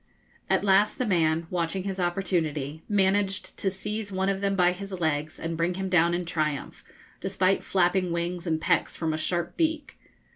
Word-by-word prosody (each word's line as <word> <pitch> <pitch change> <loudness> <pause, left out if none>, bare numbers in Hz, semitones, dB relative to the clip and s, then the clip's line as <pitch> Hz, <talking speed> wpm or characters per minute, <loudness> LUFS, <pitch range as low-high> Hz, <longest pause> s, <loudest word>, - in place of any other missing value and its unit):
At - - +2
last 195 +2 +4
the 255 - 0
man, 165 -4 +2
watching 180 +1 -1
his 195 -1 -4
opportunity, 165 -5 -1
managed 195 -1 +1
to 195 - +1
seize 205 +2 -5
one 190 0 0
of 195 0 -1
them 200 0 +1
by 180 -1 +4
his 195 +2 -7
legs 155 -3 -1
and 165 0 -3
bring 170 +2 0
him 190 0 -3
down 170 -1 +4
in 175 0 -2
triumph, 155 -4 -2 0.4
despite 190 0 +1
flapping 185 -1 +1
wings 170 +1 -2
and 160 -1 +1
pecks 175 +1 +1
from 160 -2 -1
a - - -1
sharp 170 +1 -2
beak. 315 -3 -1
180 Hz, 180 wpm, -27 LUFS, 165-195 Hz, 0.4 s, last